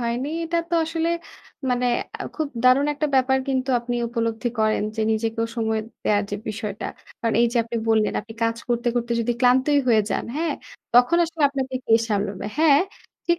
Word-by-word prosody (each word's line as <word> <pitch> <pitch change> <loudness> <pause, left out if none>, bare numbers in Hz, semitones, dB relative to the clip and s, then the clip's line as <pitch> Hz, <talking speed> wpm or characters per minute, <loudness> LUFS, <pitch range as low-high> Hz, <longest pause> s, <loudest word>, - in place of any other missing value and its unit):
হয়নি। 240 +3 -1 0.2
এটা 335 +1 0
তো - - +1
আসলে 325 +1 -1 0.6
মানে 250 0 +1 0.3
আ - - -4
খুব 310 -2 -1 0.2
দারুণ 255 +3 +5
একটা 300 +1 0
ব্যাপার 265 0 +3
কিন্তু 265 0 0
আপনি 240 +1 -3
উপলব্ধি 230 0 -1
করেন 215 -1 +2
যে 220 - 0
নিজেকেও 225 +1 -1
সময় 220 -1 0 0.2
দেওয়ার 205 0 +2
যে 205 - -2
বিষয়টা। 210 -1 -4 0.3
কারণ 230 -1 0
এইযে 235 +1 +2
আপনি 235 +1 -4
বললেন 220 -1 +3
আপনি 225 +1 -12
কাজ 230 0 0
করতে, 240 0 +1
করতে 240 0 -1
যদি 235 +1 0
ক্লান্তই 260 +4 +4
হয়ে 220 -3 +5
যান। - - -1
হ্যাঁ? 315 -2 0 0.4
তখন 250 +8 +6
আসলে 325 -1 -4
আপনাকে, 265 -2 -3
কে 225 - +5
সামলাবে? 205 -2 -2
হ্যাঁ, 305 -2 +6 0.5
ঠিক 345 - +3
240 Hz, 180 wpm, -23 LUFS, 225-275 Hz, 0.6 s, তখন